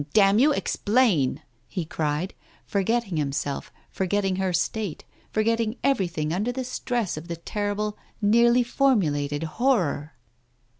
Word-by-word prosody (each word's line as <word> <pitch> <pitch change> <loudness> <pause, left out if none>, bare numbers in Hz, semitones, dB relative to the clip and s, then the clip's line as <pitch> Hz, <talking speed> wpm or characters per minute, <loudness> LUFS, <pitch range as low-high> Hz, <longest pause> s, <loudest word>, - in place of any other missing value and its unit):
Damn 200 0 +5
you, 290 +4 +5
explain! 210 - +1
" 120 +1 -40
he 180 -5 -4
cried, 155 +3 -2 0.3
forgetting 200 -2 0
himself, 140 -1 -2 0.2
for 190 - -2
getting 195 -1 +1
her 190 -1 0
state, 180 +1 -2 0.3
forgetting 225 +1 0
everything 175 - 0
under 210 +7 0
the 260 +1 -3
stress 240 -7 -2
of 160 +2 -7
the 170 - -3
terrible, 205 +4 -3 0.2
nearly 235 +3 +4
formulated 160 - +1
Horror. 165 - 0
200 Hz, 130 wpm, -25 LUFS, 160-230 Hz, 0.3 s, Damn